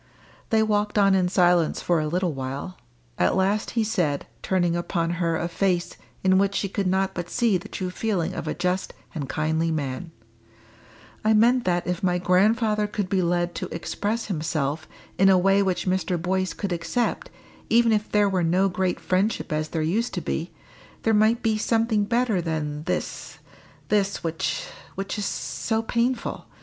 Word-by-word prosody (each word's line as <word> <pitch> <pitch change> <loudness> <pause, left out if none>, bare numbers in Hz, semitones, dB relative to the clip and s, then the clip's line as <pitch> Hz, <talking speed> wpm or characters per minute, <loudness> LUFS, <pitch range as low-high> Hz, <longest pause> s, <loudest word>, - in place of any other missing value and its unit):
They 220 -1 +3
walked 210 -1 0
on 195 -1 +5
in 185 -2 +2
silence 175 -3 +3
for 175 -2 +1
a 155 - -1
little 175 +1 0
while. 135 +7 -5 0.4
At 90 - +3
last 200 +5 0
he 225 - +4
said, 175 -10 0 0.2
turning 175 -3 +1
upon 170 -1 -1
her 165 -1 +1
a 170 - -2
face 175 0 0 0.3
in 190 0 +4
which 200 0 +1
she 200 - 0
could 195 0 -1
not 190 +1 +1
but 175 -1 -5
see 235 -5 +2
the 210 +5 -11
true 185 -1 -4
feeling 185 -4 -1
of - - -5
a - - -2
just 180 +1 -1 0.2
and 145 -6 -4
kindly 160 +2 0
man 150 +1 -3 1.1
"I 220 +1 +4
meant 240 +3 +4
that 175 -1 +1
if 180 -1 -2
my 180 -1 +2
grandfather 210 +4 +2
could 205 -2 -3
be 190 -1 +2
led 175 0 0
to - - -4
express 210 +6 -3
himself 155 -4 -2 0.3
in 195 +1 +6
a 190 - +6
way 195 +2 +4
which 190 -2 0
Mr. 185 -1 0
Boyce 185 +2 -1
could 200 - -4
accept, 240 - -1 0.4
even 230 0 +4
if 210 -1 0
there 210 -1 +4
were 190 -2 +1
no 185 +4 +3
great 185 0 -1
friendship 185 -2 0
as 155 0 -1
there 160 -2 -1
used 215 +10 0
to - - -2
be, - - -3 0.5
there 225 - +3
might 220 +2 +3
be 220 -2 +1
something 225 -2 +1
better 235 -4 +1
than 155 -2 -3
this 180 - -3 0.5
this, 200 -2 +1
which 165 -1 -2 0.3
which 195 +2 -4
is 205 - -2
so 135 - -2
painful. 235 +1 -1
185 Hz, 180 wpm, -25 LUFS, 170-210 Hz, 1.1 s, in